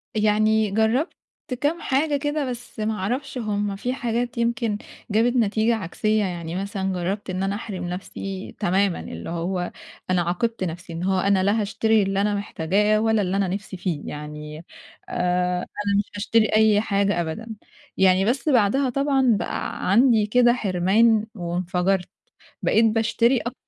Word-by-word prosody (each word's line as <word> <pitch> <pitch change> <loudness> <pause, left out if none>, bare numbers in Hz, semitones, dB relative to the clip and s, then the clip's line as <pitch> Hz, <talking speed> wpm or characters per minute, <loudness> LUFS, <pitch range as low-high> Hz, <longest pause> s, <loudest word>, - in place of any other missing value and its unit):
يعني 215 0 +2
جرّبت 220 - +1 0.5
كام 315 +4 0
حاجة 285 +2 +1
كده 290 -1 -2
بس 245 -2 -8
ما 215 +1 0
أعرفش 250 +8 -3
هم 205 -3 -2
في 245 +6 -2
حاجات 240 -1 -2
يمكن 230 -2 0 0.3
جابت 235 +4 +2
نتيجة 225 0 +2
عكسية، 215 +2 0
يعني 170 -2 -4
مثلًا 195 -1 -2
جرّبت 190 +3 -3
إن 185 +1 -2
أنا 195 +1 -1
أحرِم 200 -4 -5
نَفْسي 190 +1 -6
تمامًا، 190 +1 +1
اللي 85 - -7
هو 175 +1 -2 0.4
أنا 185 -1 +2
عاقبت 190 +6 -1
نَفْسي 175 0 -5
إن 170 +2 -4
هو 190 0 +1
أنا 195 0 +2
لا 210 +3 +2
هاشتري 220 +1 +2
اللي 195 0 0
أنا 205 0 +1
محتاجاه 205 +2 +1
ولا 220 -1 +2
اللي 190 0 -1
أنا 195 -2 +1
نِفْسي 190 0 -5
فيه، 175 -5 -2
يعني 150 0 -7 0.5
آآ 180 0 0
أنا 200 +2 -2
مش 205 - -1
هاشتري 220 +2 +2
أي 215 -1 +5
حاجة 200 -3 +1
أبدًا. 170 +8 -5 0.5
يعني 190 0 +4
بس 270 +7 0
بعدها 255 +2 +3
طبعًا 270 -3 +2
بقى 185 - -3
عندي 230 -1 +5
كده 240 +2 +4
حِرمان 210 +2 +2
وانفجرت، 180 +1 -1 0.5
بقيت 225 - +3
باشتري 230 +3 +2
أكتر 240 +1 -5
205 Hz, 155 wpm, -23 LUFS, 185-230 Hz, 0.5 s, أي